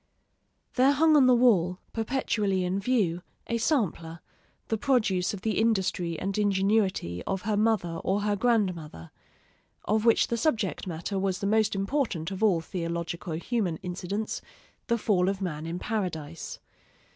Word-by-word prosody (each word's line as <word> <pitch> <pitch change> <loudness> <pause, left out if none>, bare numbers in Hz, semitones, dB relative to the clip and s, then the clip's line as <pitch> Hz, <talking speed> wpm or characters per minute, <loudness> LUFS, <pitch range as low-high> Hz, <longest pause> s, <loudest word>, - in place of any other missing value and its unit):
There 265 +2 +4
hung 310 +2 +4
on 275 -4 +6
the 250 - +6
wall, 190 -8 +3 0.2
perpetually 215 -5 0
in 180 +2 -1
view, 195 -6 +1 0.2
a 230 0 -1
sampler, 180 - -1 0.5
the 225 - +1
produce 215 -10 +1
of 200 - -7
the 220 0 0
industry 190 -6 0
and 195 0 -2
ingenuity 195 - +1
of 195 -1 -2
her 210 0 0
mother 205 -6 +1
or 195 +2 +1
her 205 0 +1
grandmother, 180 - -1 0.7
of 215 +1 +1
which 230 -1 +4
the 235 - 0
subject 220 - -1
matter 175 +3 -3
was 190 -1 0
the 200 - -4
most 215 0 +2
important 195 - -1
of 190 +1 -5
all 195 -7 +3
theologico 170 0 -4
human 195 -6 -1
incidents, 185 +4 -3 0.5
the 235 - +2
fall 195 -5 +2
of 195 -1 -2
man 165 -5 -4
in 170 +1 -3
Paradise. 170 -8 -4
195 Hz, 150 wpm, -27 LUFS, 175-225 Hz, 0.7 s, on